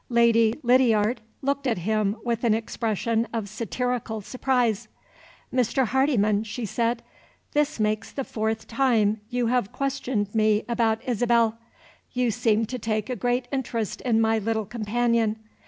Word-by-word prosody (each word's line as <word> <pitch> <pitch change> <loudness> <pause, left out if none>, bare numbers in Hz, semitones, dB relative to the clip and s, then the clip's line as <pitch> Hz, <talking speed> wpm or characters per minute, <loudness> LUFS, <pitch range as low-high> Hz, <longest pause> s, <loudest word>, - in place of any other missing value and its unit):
Lady 230 -1 +4
Lydiard 235 -2 +3 0.2
looked 280 0 0
at 235 - +1
him 210 +2 0
with 235 -1 -1
an 225 -2 +4
expression 225 0 -1
of 225 -3 -3
satirical 230 +1 -3
surprise. 245 -1 0 0.7
"Mr. 250 +1 +2
Hardyman," 225 -5 +2
she 225 +2 -5
said, 235 +3 -1 0.5
"this 295 -5 0
makes 215 0 0
the 275 - -3
fourth 220 -2 -3
time 225 -4 +2
you 245 -1 0
have 235 -3 +1
questioned 260 -7 -2
me 215 -1 +3
about 225 -2 +1
Isabel. 235 -2 +2 0.5
You 250 -2 +1
seem 225 -1 +2
to 250 +3 -5
take 215 +1 -2
a - - -1
great 245 +2 0
interest 235 -6 -2
in 230 -3 +2
my 225 0 +3
little 220 0 -1
companion. 230 0 0
230 Hz, 140 wpm, -25 LUFS, 215-245 Hz, 0.7 s, Lady